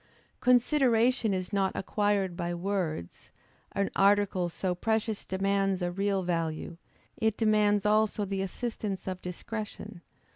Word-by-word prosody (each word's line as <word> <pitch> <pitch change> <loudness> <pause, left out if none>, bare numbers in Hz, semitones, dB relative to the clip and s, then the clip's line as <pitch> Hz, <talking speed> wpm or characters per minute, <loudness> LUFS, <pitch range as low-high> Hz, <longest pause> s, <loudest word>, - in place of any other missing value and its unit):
Consideration 250 -2 +3
is 185 +1 -3
not 195 -1 +1
acquired 200 -3 0
by 175 0 -2
words; 175 - -3 0.4
an 200 -1 0
article 195 -3 +3
so 180 +2 -2
precious 220 +3 -1
demands 195 0 0
a 175 - 0
real 195 +1 0
value; 165 -1 -2 0.4
it 220 -1 +1
demands 210 -2 +3
also 215 0 +2
the 195 0 -2
assistance 200 -1 -4
of 185 -1 -4
discretion. 210 +1 -6
200 Hz, 120 wpm, -29 LUFS, 185-215 Hz, 0.4 s, Consideration